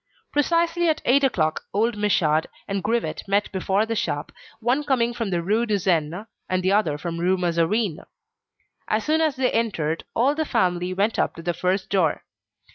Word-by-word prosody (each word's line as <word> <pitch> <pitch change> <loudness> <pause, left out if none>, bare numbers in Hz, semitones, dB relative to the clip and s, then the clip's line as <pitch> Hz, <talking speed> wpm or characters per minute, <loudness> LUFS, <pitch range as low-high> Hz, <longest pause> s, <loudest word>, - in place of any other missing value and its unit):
Precisely 335 +3 +2
at 310 - +1
eight 275 +3 +4
o'clock 155 -12 +1
old 225 +2 +2
Michaud 165 -7 +2 0.2
and 195 -1 -2
Grivet 230 +2 -1
met 200 +1 +1
before 195 +2 +1
the 225 - -2
shop, 145 -7 -2 0.3
one 245 +6 +1
coming 245 -4 +1
from 230 -3 -3
the 175 -2 -1
Rue 220 +6 +1
de 210 -2 +2
Seine, 175 0 0 0.2
and 185 0 0
the 185 - +2
other 195 -8 +2
from 165 +2 -5
the 170 - -3
Rue 185 +1 +3
Mazarine. 175 +1 0 0.9
As 215 0 0
soon 315 +1 +2
as 310 -4 +1
they 255 -1 +1
entered, 165 -9 -1
all 260 +5 +3
the 315 +1 -1
family 180 - 0
went 200 +4 0
up - - 0
to 165 - -9
the 175 0 0
first 185 +3 -1
floor. 180 -6 +1
200 Hz, 190 wpm, -24 LUFS, 175-235 Hz, 0.9 s, eight